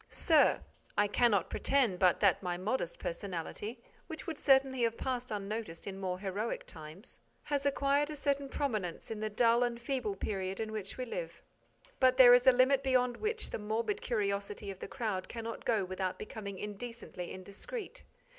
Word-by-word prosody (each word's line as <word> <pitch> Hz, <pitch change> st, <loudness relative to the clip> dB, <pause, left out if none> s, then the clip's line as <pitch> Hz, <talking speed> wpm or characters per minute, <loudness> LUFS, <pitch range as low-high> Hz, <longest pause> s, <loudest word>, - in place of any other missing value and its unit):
_ -, -, -23 dB
SIR: 315 Hz, -3 st, +4 dB, 0.4 s
I 205 Hz, -, +4 dB
cannot 210 Hz, -2 st, +2 dB
pretend 250 Hz, -10 st, +2 dB
but 185 Hz, -2 st, +4 dB
that 200 Hz, -3 st, +4 dB
my 180 Hz, -2 st, -2 dB
modest 185 Hz, -1 st, -2 dB
personality, 200 Hz, +6 st, -5 dB, 0.3 s
which 320 Hz, -, -6 dB
would 320 Hz, -3 st, -5 dB
certainly 265 Hz, -2 st, +4 dB
have 230 Hz, -1 st, +1 dB
passed 250 Hz, -1 st, -2 dB
unnoticed 205 Hz, -4 st, -4 dB
in 195 Hz, -1 st, -6 dB
more 185 Hz, -2 st, -2 dB
heroic 200 Hz, +4 st, -3 dB
times, 160 Hz, +7 st, -6 dB, 0.2 s
has 285 Hz, -1 st, 0 dB
acquired 280 Hz, +1 st, +2 dB
a 305 Hz, -, -5 dB
certain 280 Hz, -1 st, -1 dB
prominence 215 Hz, -, -2 dB
in 220 Hz, -, -4 dB
the 215 Hz, 0 st, -1 dB
dull 230 Hz, +2 st, +4 dB
and 240 Hz, -1 st, 0 dB
feeble 240 Hz, -5 st, -2 dB
period 190 Hz, -1 st, -3 dB
in 220 Hz, -1 st, -3 dB
which 210 Hz, -3 st, -5 dB
we 255 Hz, -, -3 dB
live. -, -, -6 dB, 0.6 s
But 255 Hz, -1 st, +5 dB
there 245 Hz, -2 st, +10 dB
is 245 Hz, +1 st, +5 dB
a -, -, +11 dB
limit 255 Hz, +2 st, +4 dB
beyond 250 Hz, -2 st, +2 dB
which 440 Hz, +1 st, -1 dB
the -, -, -3 dB
morbid 225 Hz, -, -1 dB
curiosity 200 Hz, -2 st, -2 dB
of 190 Hz, -, -10 dB
the -, -, -6 dB
crowd 215 Hz, -8 st, -3 dB
cannot 230 Hz, 0 st, -6 dB
go 215 Hz, -5 st, +2 dB
without 185 Hz, 0 st, -3 dB
becoming 200 Hz, -3 st, -6 dB
indecently 210 Hz, -2 st, -6 dB
indiscreet. 205 Hz, -, -6 dB
225 Hz, 175 wpm, -33 LUFS, 195-260 Hz, 0.6 s, a